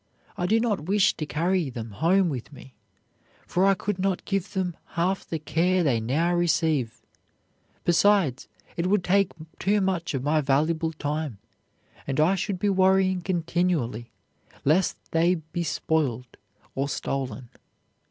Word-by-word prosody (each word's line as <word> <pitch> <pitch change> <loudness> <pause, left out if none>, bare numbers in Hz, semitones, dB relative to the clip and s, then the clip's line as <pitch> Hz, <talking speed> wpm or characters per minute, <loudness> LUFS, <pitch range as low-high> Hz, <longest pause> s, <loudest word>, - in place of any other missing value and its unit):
I 175 - -1
do 220 +4 +3
not 215 -9 -1
wish 200 0 +3
to 155 - -4
carry 170 0 0
them 115 -3 -7
home 175 - +2
with 130 -1 -5
me, 135 -2 -13 0.7
for 185 +2 +2
I 195 - +4
could 195 +1 -3
not 190 -1 -1
give 195 -1 -2
them 185 -4 -1 0.2
half 185 +3 0
the 165 - -1
care 170 +4 +1
they 130 -7 +2
now 150 +10 0
receive; 160 -8 0 0.8
besides, 175 -7 +3 0.3
it 170 +1 -1
would 200 -1 +2
take 195 +1 +2 0.3
too 205 +2 +2
much 185 -5 -1
of 130 - -2
my 155 +2 +2
valuable 155 +4 +1
time, 150 -5 -3 0.7
and 135 +1 -1
I 160 +5 +4
should 195 0 -2
be 205 - -1
worrying 190 -1 +3
continually 170 - -1 0.6
lest 165 +6 +2
they 170 +2 +3
be 160 +1 -5
spoiled 135 -7 -1 0.4
or 140 +1 -2
stolen. 130 -3 -4
170 Hz, 145 wpm, -26 LUFS, 145-185 Hz, 0.8 s, I